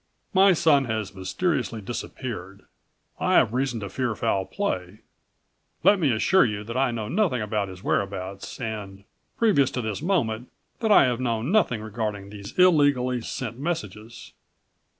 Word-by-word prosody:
My 195 0 +6
son 150 -5 +3
has 110 -4 -3
mysteriously 115 - -2
disappeared. 100 -3 -6 0.6
I - - +2
have 110 - +4
reason 125 -3 -1
to 100 - -5
fear 120 +1 -2
foul 95 -1 0
play. 100 - -3 0.8
Let 200 -1 +5
me 150 -7 +2
assure 175 +12 +4
you 105 -3 -2
that 115 +3 -7
I 135 0 +2
know 115 -3 -3
nothing 180 - +1
about 105 -1 -1
his 95 0 -11
whereabouts 95 0 -3
and, 105 -5 -6 0.3
previous 195 - +3
to 125 - -3
this 110 +1 -3
moment, 125 - 0 0.3
that 220 -2 +1
I 205 - +8
have 125 -2 0
known 120 +2 -1
nothing 160 - +2
regarding91 105 -2 -4
these 100 -1 -10
illegally 145 -8 +4
sent 120 +1 -5
messages." 115 - -5
115 Hz, 150 wpm, -25 LUFS, 105-140 Hz, 0.8 s, I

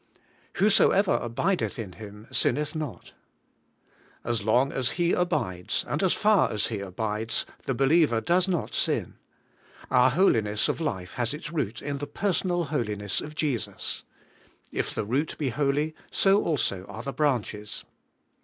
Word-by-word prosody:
Whosoever 200 -1 +4
abideth 145 +9 -1
m 110 -6 -5
Him 105 +3 -11
sinneth 150 +4 +1
not. 155 -6 -6 0.5
' - - -34
As 115 -2 0
long 125 +6 +3
as 130 -2 0
he 175 0 +2
abides, 140 - 0
and - - -1
as 190 -2 +3
far 210 -2 +3
as 105 - +1
he 110 -3 -3
abides, 105 +3 -2 0.2
the 135 - 0
be 135 - +2
liever 150 -5 +4
does 175 +8 +2
not 175 -4 -1
sin. - - 0 0.7
Our 125 0 +6
holiness 115 - +2
of - - -2
life 95 - -3
has 120 +2 -1
its 150 0 -7
root 125 -9 -2
in 140 0 -3
the 145 - -4
personal 175 +1 0
holiness 105 -6 -1
of 150 0 -8
Jesus. 145 -7 -2 0.7
*If - - -1
the - - -3
root 135 +8 -1
be 145 -4 -1
holy, 145 +4 0 0.2
so 195 +1 +3
also 100 - -1
are 110 - -8
the 140 - -4
branches.' 115 -8 -1
135 Hz, 155 wpm, -27 LUFS, 110-160 Hz, 0.7 s, Our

